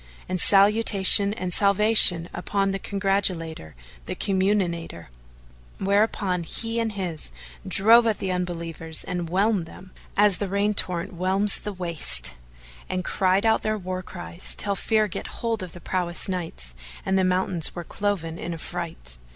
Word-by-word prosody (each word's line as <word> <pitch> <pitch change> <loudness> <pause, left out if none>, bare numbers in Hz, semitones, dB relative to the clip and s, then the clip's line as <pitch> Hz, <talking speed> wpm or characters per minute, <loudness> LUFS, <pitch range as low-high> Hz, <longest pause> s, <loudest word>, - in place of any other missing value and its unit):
and 185 -1 0
Salutation 200 -1 +6
and 180 -3 -4
Salvation 200 -4 +5
upon 195 +3 -1
the 195 - -3
Congratulator, 185 - -2 0.3
the - - -4
Comminator."[FN#439] 185 - -1 0.7
Whereupon 200 -2 0
he 225 +7 -3
and 225 -2 -2
his 180 -6 -4 0.4
drove 225 +5 +5
at 220 - +1
the 190 - -3
Unbelievers 170 -3 -4
and 175 -2 -4
whelmed 195 -1 0
them, 185 +2 -14 0.3
as 205 -2 +4
the 200 - -4
rain 200 +2 0
torrent 180 -4 -1
whelms 190 +3 +1
the 210 - -6
waste; 155 - +1 0.6
and 185 -1 -3
cried 190 +2 +1
out 220 0 +3
their 215 0 -1
war 185 -1 -5
cries, 175 -1 -7
till 200 - 0
fear 215 +1 +1
get 190 - -6
hold 230 -2 -3
of 180 -3 -8
the 175 - -10
prowess 175 -1 -3
Knights 165 - -5 0.3
and 190 - 0
the 190 - +2
mountains 185 -2 0
were 175 - -5
cloven 170 -4 -3
in 175 - -5
affright. 160 - -6
185 Hz, 150 wpm, -24 LUFS, 175-205 Hz, 0.7 s, Salutation